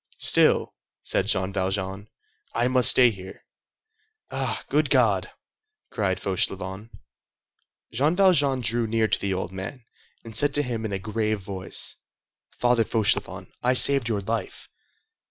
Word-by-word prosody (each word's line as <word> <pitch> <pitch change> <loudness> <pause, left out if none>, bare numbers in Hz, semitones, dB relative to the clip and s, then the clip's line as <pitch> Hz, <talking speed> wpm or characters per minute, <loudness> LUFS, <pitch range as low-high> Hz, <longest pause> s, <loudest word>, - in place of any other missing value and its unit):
"Still," - - +3 0.3
said 95 - -1
Jean 95 -2 0
Valjean, 95 +1 -3 0.5
"I 120 - +1
must 125 -1 +4
stay 125 -2 +5
here." 95 -2 -12 0.9
"Ah, - - -3
good - - +1
God!" - - +2 0.6
cried 95 -3 -1
Fauchelevent. 95 +2 -3 1.0
Jean 145 +8 +1
Valjean 145 -9 +3
drew 115 +1 0
near 110 0 +1
to - - 0
the 95 -1 -2
old 90 -1 -4
man, 95 +7 -8 0.4
and 115 -2 -11
said 145 +5 +2
to 145 - +2
him 115 -4 -4
in 110 - -4
a 100 - -2
grave 110 +1 -2
voice:— 95 -1 -1 0.6
"Father 120 -1 +2
Fauchelevent, 110 -1 0
I 125 +1 +1
saved 135 -2 +5
your 105 -3 -1
life." 115 +4 -5
110 Hz, 135 wpm, -24 LUFS, 95-125 Hz, 1.0 s, stay